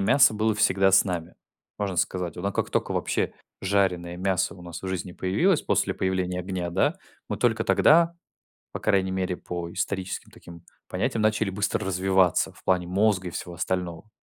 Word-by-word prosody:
мяса 170 - +5
было 110 +1 +1
всегда 95 -2 +3
с 95 - +6
нами, 90 -4 -4 0.4
можно 100 -3 -2
сказать. 90 -1 -1
Но 100 +3 -2
как - - -2
тока - - 0
вообще - - -1 0.3
жареное 95 -3 0
мясо 95 -1 0
у 90 - -13
нас 85 -1 -8
в - - -5
жизни 90 -1 -4
появилось 150 - +1
после - - +1
появления 95 -1 -1
огня, 90 -1 -3
да, - - +1 0.3
мы - - -2
только - - +1
тогда, 165 +2 +5 0.6
по - - -5
крайней 95 -3 +1
мере 95 -1 -1
по 85 -1 -5
историческим 95 -1 -3
таким 85 -1 -13 0.2
понятиям, 115 - -1
начали 110 -1 +2
быстро 100 +1 -1
развиваться 95 -1 +2
в - - -20
плане 90 -2 +1
мозга 95 0 +2
и 85 - -5
всего 85 0 -6
остального. 90 +1 -3
95 Hz, 175 wpm, -26 LUFS, 90-100 Hz, 0.6 s, с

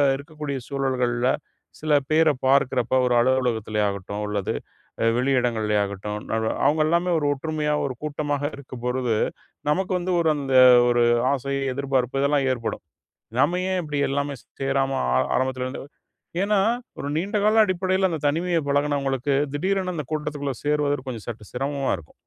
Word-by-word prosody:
இருக்கக்கூடிய 145 0 -5
சூழல்கள்ல 130 -3 0 0.5
சில 155 -1 0 0.2
பேர 160 +1 +5 0.2
பார்க்குறப்போ, 130 -2 +2
ஒரு 125 - +2
அலுவலகத்திலே 120 -4 +1
ஆகட்டும், 100 +1 -5
அல்லது 105 -2 -2 0.6
வெளியிடங்களிலே 120 -5 +1
ஆகட்டும், 100 +1 -5
நான்லா 110 0 0
அவங்கல்லாமே 160 +4 +2
ஒரு 150 - -2
ஒற்றுமையா, 150 +1 -2
ஒரு 135 - -2
கூட்டமா 145 -1 -2 0.2
இருக்கும் 130 -3 -10
பொழுது, 125 -2 0 0.6
நமக்கு 185 +5 0
வந்து, 180 +1 -2
ஒரு 160 -2 +3
அந்த 135 -2 -2 0.3
ஒரு 120 0 +3 0.3
ஆசை, 140 +1 -3 0.2
எதிர்பார்ப்பு 135 -1 0
இதெல்லாம் 140 -1 +2
ஏற்படும். 115 -7 -4 0.6
நம்ம 155 +6 +3
ஏன் 185 - +1
இப்டி 150 -2 -4
எல்லாமே 140 0 -1
சே - - -31 0.2
சேராம? 135 0 +1 0.2
ஆ - - +4 0.2
ஆரம்பத்திலருந்து, 130 0 -2 0.6
ஏன்னா 205 0 +2 0.4
ஒரு 140 - -4
நீண்டகால 210 +5 +3
அடிப்படையில, 185 0 +1
அந்த 160 -2 -3
தனிமைய 170 +3 0
பழகுனவங்களுக்கு, 140 -1 0 0.2
திடீரென 185 +4 0
அந்த 150 -4 -4
கூட்டத்துக்குள்ள 145 -2 -2
சேருவது, 145 -2 0
கொஞ்சம் 115 -4 -6
சற்று 110 -4 -7
சிரமமா 135 +1 -1
இருக்கும். 80 - -16
140 Hz, 135 wpm, -24 LUFS, 125-155 Hz, 0.6 s, பேர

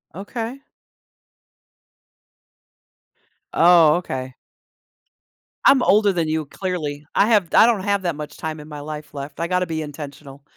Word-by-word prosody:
Okay. 230 +7 -6 2.9
Oh, 165 -3 +6
okay. 130 -7 -5 1.3
I'm 270 - +6
older 205 0 +4
than 170 -3 -1
you, 155 0 -1
clearly. 150 -4 -4
I 205 - +4
have 205 -7 +2
I - - +7
don't 225 -5 +1
have 200 -1 0
that 175 -3 -1
much 150 0 -8
time 160 -1 -5
in 150 - -11
my 150 -1 -8
life 150 0 -8
left. 140 +1 -8
I 170 - -1
gotta 180 0 0
be 160 -1 -3
intentional. 145 -2 -9
160 Hz, 135 wpm, -21 LUFS, 150-190 Hz, 2.9 s, I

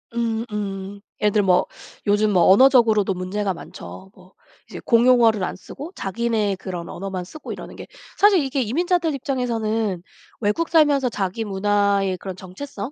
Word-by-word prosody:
음 230 -1 -1
음. 200 -1 -5 0.2
예를 210 - +2
들면 205 -2 +2
뭐 180 -1 +4 0.4
요즘 210 +1 +2
뭐 180 -3 +4
언어적으로도 220 -3 +5
문제가 190 +2 -2
많죠. 190 +2 -11
뭐 185 0 -19 0.4
이제 - - -8
공용어를 230 -3 +4
안 - - -3
쓰고 285 - -10
자기네 210 0 -1
그런 180 -3 -6
언어만 190 -1 -5
쓰고 310 +12 -10
이러는 - - -8
게 - - -10 0.3
사실 410 -2 +5
이게 270 0 -1
이민자들 335 - 0
입장에서는 225 -7 -2 0.4
외국 225 +10 0
살면서 290 -5 +3
자기 200 0 -3
문화의 200 -1 +1
그런 190 0 -7
정체성 200 +5 -7
210 Hz, 340 characters per minute, -22 LUFS, 195-245 Hz, 0.4 s, 언어적으로도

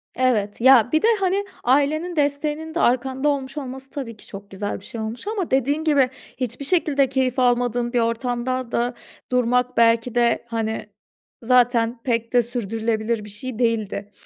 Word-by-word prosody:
Evet. 230 -5 0
Ya 245 -3 +6
bir 315 - +3
de, - - +3
hani, 390 +1 0 0.2
ailenin 295 +7 +1
desteğinin 300 +2 -1
de - - 0
arkanda 265 +1 +1
olmuş 275 0 -3
olması, 265 -1 -6
tabii 240 -6 -6
ki, - - -15
çok 200 0 -10
güzel 205 +1 -4
bir 195 - -16
şey 235 -4 -6
olmuş 225 - -6
ama 415 -5 -2
dediğin 280 +4 +1
gibi, 285 -5 +3 0.3
hiçbir 255 +2 -3
şekilde 285 -5 +2
keyif 260 -1 0
almadığın 245 -1 +1
bir 245 - +3
ortamda 245 +2 -1
da 240 +1 0 0.4
durmak 250 0 +1
belki 230 +1 +3
de, 235 -1 +2
hani, 220 -2 -3 0.5
zaten 240 -1 +3
pek 230 -2 -1
de 245 -1 +5
sürdürülebilir 225 -1 -2
bir 210 - -10
şey 220 +3 -5
değildi. 215 -4 -1
245 Hz, 165 wpm, -22 LUFS, 230-270 Hz, 0.5 s, Ya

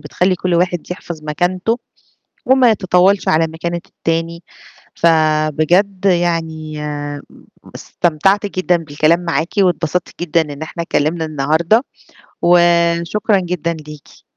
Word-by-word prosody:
بتخلّي 180 +5 0
كل 180 0 -2
واحد 175 0 -1
يحفظ 170 -3 -7
مكانته 180 +9 -1 0.7
وما 260 -2 +5
يتطاولش 190 -1 +2
على 160 +1 +3
مكانة 170 +2 -4
التاني، 165 +1 -3 0.5
فبجد 160 +4 +2
يعني 165 -4 0
آمم 145 -1 -5 0.5
استمتعت 195 +5 0
جدًا 185 -3 0
بالكلام 155 +1 +1
معاكِ 165 -1 -2
واتبسطت 180 -3 0
جدًا 170 -1 +2
إن 145 -2 -7
إحنا 165 +2 -5
اتكِّلمنا 160 +1 -1
النهاردة، 160 - +1 0.6
وشكرًا 175 +4 +3
جدًا 175 -2 -2
ليكِ. 150 -1 -13
170 Hz, 110 wpm, -17 LUFS, 155-180 Hz, 0.7 s, وما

